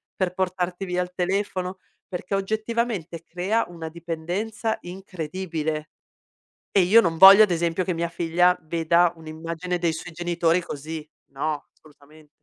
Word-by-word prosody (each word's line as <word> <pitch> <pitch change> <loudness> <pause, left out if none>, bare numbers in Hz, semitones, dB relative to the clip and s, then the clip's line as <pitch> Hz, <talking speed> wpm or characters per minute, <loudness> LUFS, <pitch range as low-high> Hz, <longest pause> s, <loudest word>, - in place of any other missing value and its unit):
Per 185 -2 -1
portarti 185 0 -2
via 180 0 -1
il 180 - -9
telefono?" 185 0 -2 0.3
perché 180 +1 -3
oggettivamente 215 -4 -2
crea 190 +7 -1
una 165 -2 -7
dipendenza 175 +7 -3
incredibile, 165 -4 -4 0.8
e 195 - +4
io 200 +6 +7
non 165 -4 -1
voglio 195 +3 +11
ad 210 - +4
esempio 170 +1 0
che 180 - -1
mia 170 +1 -1
figlia 175 +1 +2
veda 170 +2 +2
un'immagine 165 +2 -4
dei 170 -2 +1
suoi 160 +1 -7
genitori 170 0 +1
così. 155 +1 -6 0.3
No, 145 +2 -3
assolutamen 150 0 -20
175 Hz, 135 wpm, -24 LUFS, 165-185 Hz, 0.8 s, voglio